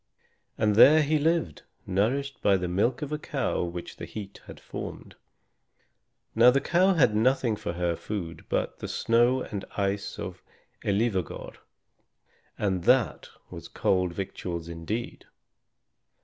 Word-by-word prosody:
And 105 -2 +2
there 155 +7 +8
he 150 +1 +1
lived, 160 - 0 0.2
nourished 125 +8 -1
by 100 -1 +4
the 90 -1 -3
milk 110 - 0
of 150 - -5
a 150 - -2
cow - - -2
which 85 0 -6
the - - -6
heat 100 -2 -9
had - - -10
formed. - - -8 1.2
Now 120 +2 +7
the 135 +2 +3
cow 180 +6 +3
had 120 -9 +4
nothing 120 0 +2
for 85 - -5
her 85 -1 -1
food 85 -3 -6
but - - -1
the - - -5
snow 120 +3 +2
and 100 -3 -5
ice 100 0 -1
of - - -6 0.4
Elivâgar, 100 -3 -1 1.0
and 95 -4 -1
that 125 -3 +2 0.2
was - - -8
cold 90 -2 0
victuals 85 -3 -5
indeed! 85 +8 -5
105 Hz, 135 wpm, -27 LUFS, 90-130 Hz, 1.2 s, there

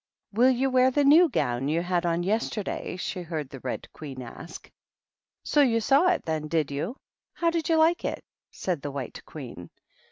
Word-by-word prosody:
"Will 240 +5 +5
you 260 +1 +1
wear 255 0 +5
the 285 +3 +2
new 315 +5 +7
gown 130 - -1
you 165 +3 +1
had 175 -1 0
on 170 +1 0
yesterday?" 210 -1 -2
she 185 0 -4
heard 155 -5 -5
the 135 - -8
Red 125 0 -5
Queen 135 -4 -8
ask. 160 +7 -10 0.4
" - - -67 0.3
So 295 - +3
you 235 -5 +3
saw 275 +9 +4
it, 360 - +1
then, 155 -1 -2
did 155 -2 0
you? 165 - -3 0.4
How 335 -1 +1
did 330 -1 -2
you 325 - +4
like 320 +2 +3
it - - -3 0.2
?" - - -68
said 175 -6 -3
the 145 - -4
White 135 -3 -6
Queen. 120 - -9
180 Hz, 200 wpm, -27 LUFS, -, 0.4 s, new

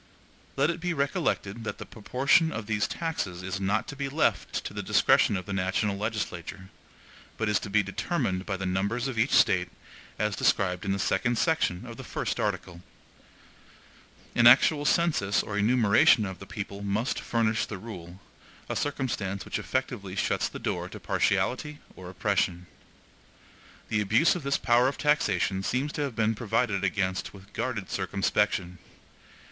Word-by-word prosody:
Let 140 +4 +2
it 170 - -6
be 175 0 -2
recollected 140 - -1
that - - -4
the - - -8
proportion 135 +8 +2
of 115 -7 -5
these 105 -1 0
taxes 100 - -3
is 95 +1 -3
not 100 +3 0
to 145 - -6
be 140 -1 -3
left 150 +3 0
to - - -5
the - - -4
discretion 100 - +3
of 90 - -6
the 100 - -5
national 95 +2 0
legislature, 100 -3 -4 0.7
but 110 - -1
is 105 - +2
to - - -7
be 105 +1 +3
determined 95 0 -2
by 95 -2 -2
the 95 - -4
numbers 100 +7 -1
of 125 -4 -3
each 120 +5 +3
State, 95 -8 +4 0.5
as 105 0 0
described 90 0 +1
in 100 - 0
the 100 - 0
second 120 +5 0
section 150 - +1
of - - -9
the - - -8
first - - -3
article. 85 -1 -3 1.5
An 120 0 +6
actual 145 +4 +6
census 150 -12 +2
or 105 - -5
enumeration 110 0 +4
of 95 -2 -6
the 100 - -10
people 100 -1 -6
must 100 +5 -1
furnish 115 -2 0
the 105 - -6
rule, 90 -4 -9 0.5
a - - -2
circumstance 110 -9 -2
which - - -3
effectually - - -3
shuts - - 0
the - - -8
door - - -3
to - - -9
partiality 150 +4 0 0.2
or 90 -1 -9
oppression. 95 -2 0 1.2
The 105 -2 +1
abuse 110 +11 +4
of 180 - -4
this 140 0 0
power 120 +1 +3
of 140 - -2
taxation 105 - +1
seems 130 +9 -1
to - - -3
have 140 -5 -2
been 110 0 +2
provided 110 -2 0
against 95 0 -1
with 100 +1 -15
guarded 110 -7 -3
circumspection. 95 -1 0
105 Hz, 165 wpm, -28 LUFS, 95-125 Hz, 1.5 s, An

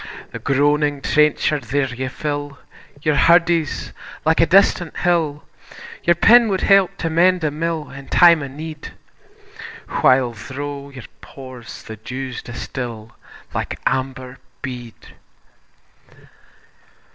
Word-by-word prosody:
The - - -7
groaning 145 +1 +1
trencher 150 +1 +2
there 135 +1 -2
ye 130 +2 -4
fill, 145 +1 -4 0.5
Your 155 - +2
hurdies 170 0 +2 0.3
like 160 +1 +3
a 165 - +4
distant 180 -3 +3
hill, 160 -5 0 0.6
Your 170 - +4
pin 230 +6 +6
wad 190 -2 -1
help 195 -1 +4
to 165 - -2
mend 180 +2 +3
a 155 - +1
mill 160 0 -3
In 140 0 -11
time 170 -3 +6
o' 140 - -4
need, 155 +3 -8 1.1
While 130 -2 +4
thro' 140 +5 -7
your 130 -3 -11 0.2
pores 130 -3 -11
the 110 - -9
dews 130 +3 -6
distil 115 -2 -7 0.4
Like - - -4
amber 130 -1 -2 0.2
bead. 120 -3 -8
145 Hz, 120 wpm, -20 LUFS, 130-165 Hz, 1.1 s, pin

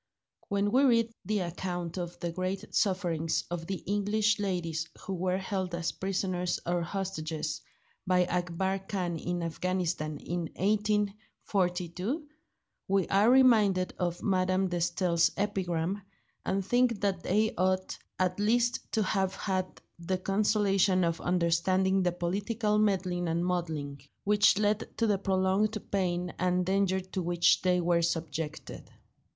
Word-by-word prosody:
When 200 0 0
we 260 - +4
read 230 -3 +3
the 210 -2 0
account 175 -1 -4
of 175 0 -6
the 170 - -3
great 185 +3 -4
sufferings 175 -5 +1
of 165 -1 -4
the 190 -2 -4
English 205 +1 +1
ladies 170 -5 -2
who 195 - -5
were 185 0 0
held 190 -2 -3
as 170 -1 -1
prisoners 185 -2 -1
or 175 0 0
hostages 165 -4 -3 0.5
by 180 -1 +4
Akbar 180 +2 -1
Khan 185 -3 -3
in 175 +1 -2
Afghanistan 170 -2 -2
in 170 +1 -4
1842, 205 - -1 0.6
we 195 -2 +2
are 200 +4 +4
reminded 215 -8 +4
of 175 -1 -2
Madame 185 -1 +1
de 175 - -1
Staël's 170 0 +2
epigram, 190 -2 -1 0.5
and 190 0 0
think 245 -1 +2
that 195 -3 0
they 215 +5 +1
ought 185 +1 0 0.2
at 185 +1 0
least 235 +3 +2
to 220 - +2
have 190 -1 0
had 185 -2 -3 0.2
the 180 +2 -1
consolation 195 -1 +2
of 170 -1 0
understanding 185 +2 +2
the 180 -1 +2
political 205 +5 -1
meddling 185 -4 +1
and 170 +2 0
muddling, 160 -6 -2 0.2
which 205 0 +4
led 210 0 0
to 230 - +2
the 205 -3 +2
prolonged 195 +3 +1
pain 180 -2 -1
and 180 0 +1
danger 190 0 +2
to 185 0 -5
which 175 0 +3
they 180 -1 +2
were 170 -1 +2
subjected. 160 -2 -3
185 Hz, 135 wpm, -30 LUFS, 175-200 Hz, 0.6 s, we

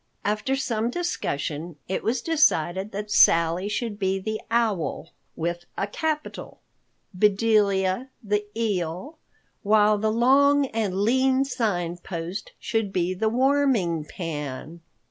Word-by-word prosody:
After 215 +6 0
some 235 -4 -1
discussion, 165 - -3
it 190 - -2
was 235 +2 -1
decided 195 - +2
that 210 +1 -5
Sally 170 +3 +4
should 210 -1 -3
be 190 -1 0
the 215 +3 -4
Owl 215 -8 -1 0.2
(with 170 +1 -3
a - - 0
capital), 305 +8 -4 0.5
Bedelia 205 +2 +2
the 210 0 0
Eel, 205 - -2 0.4
while 210 0 +4
the 215 +1 +1
long 275 +5 +4
and 220 -7 -2
lean 260 +4 +3
Sign 180 -10 -1
Post 175 +2 -6
should 225 -3 -2
be 180 -1 0
the 220 +4 0
Warming 250 - +2
Pan. 155 -1 -6
210 Hz, 120 wpm, -25 LUFS, 175-235 Hz, 0.5 s, Sally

